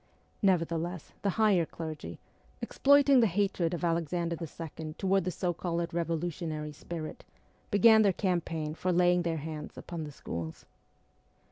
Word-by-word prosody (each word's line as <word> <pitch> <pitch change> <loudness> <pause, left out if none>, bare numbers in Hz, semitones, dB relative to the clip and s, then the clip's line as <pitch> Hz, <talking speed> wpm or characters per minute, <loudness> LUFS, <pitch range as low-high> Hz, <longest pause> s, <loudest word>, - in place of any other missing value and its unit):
Nevertheless 170 -2 0
the 200 - +1
higher 210 -6 +4
clergy, 160 -1 -6 0.4
exploiting 280 -1 +5
the 230 - +5
hatred 190 -3 0
of 175 - -6
Alexander 170 0 0
II. 160 -1 -7
toward 195 -1 +2
the - - 0
so 180 0 -1
called 170 0 -2
revo 165 -1 -1
lutionary 155 -3 -4
spirit, 155 +1 -7 0.5
began 220 +2 +7
their 200 -2 +5
campaign 170 -5 -1
for 180 +3 -1
laying 180 0 +4
their 165 -1 -1
hands 155 0 -6
upon 170 -2 -6
the 150 - -7
schools. 85 - -6
170 Hz, 140 wpm, -30 LUFS, 160-185 Hz, 0.5 s, began